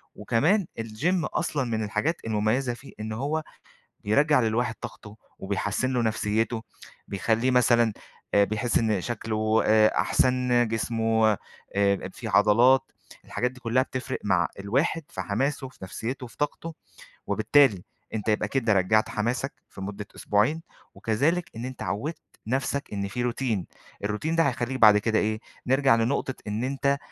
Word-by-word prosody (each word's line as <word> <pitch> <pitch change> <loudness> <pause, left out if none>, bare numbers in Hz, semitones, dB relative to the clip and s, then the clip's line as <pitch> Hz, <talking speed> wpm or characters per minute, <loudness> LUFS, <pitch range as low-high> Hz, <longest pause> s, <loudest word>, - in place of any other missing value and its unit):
وكمان 150 - +2
الGym 135 +11 0
أصلًا 140 -3 0
من 110 -3 -2
الحاجات 110 +11 -1
المميزة 110 +4 +1
فيه، 125 +3 -13
إن 110 +1 -4
هو 145 +7 -2 0.6
بيرجّع 140 +8 +4
للواحد 115 +1 0
طاقته 105 0 -9 0.2
وبيحسِّن 105 +6 -1
له 125 -2 +1
نفْسيته، 110 +1 0 0.5
بيخليه 110 +5 +1
مثلًا، 120 -2 +4 0.4
آآ، 100 - +6
بيحس 110 +4 0
إن 110 -4 +1
شكله، 110 0 0
آآ، 110 0 +5
أحسن 125 -2 +2
جسمه، 110 -1 +1 0.4
آآ، 100 -1 +2
فيه - - -6
عضلات، 120 +6 +4 0.3
الحاجات 125 - -1
دي 130 0 -15
كلها 120 +1 +2
بتفْرِق 130 0 -4
مع 90 -4 +2
الواحد 135 +11 0
في - - -6
حماسه، 135 +6 -1
في - - -20
نفْسيته، 125 +7 -5
في 115 - -16
طاقته، 160 +2 -3 0.5
وبالتالي 130 -11 +3 0.3
أنت 110 -1 -2
يبقى 105 0 +1
كده 115 -1 +1
رجّعت 100 +3 +3
حماسك 120 +6 -2 0.2
في 95 - -11
مدة 100 +1 -6
أسبوعين، 110 +11 +1 0.3
وكذلك 150 +11 0
إن 115 +2 -5
أنت 130 -1 -6
عوِّدت 105 - -3 0.3
نفْسَك 135 +1 -2
إن 100 -1 -2
في 120 +4 -3
Routine، 115 -7 -1 0.4
الRoutine 130 +11 -2
ده 165 - +4
هيخليك 130 0 -2
بعد 105 -2 +8
كده 110 +1 +1
إيه، 110 +1 0 0.3
نرجع 135 -1 +4
لنقطة 125 +3 0
إن 105 +3 -2
أنت 140 +1 +1
115 Hz, 145 wpm, -26 LUFS, 105-130 Hz, 0.6 s, بعد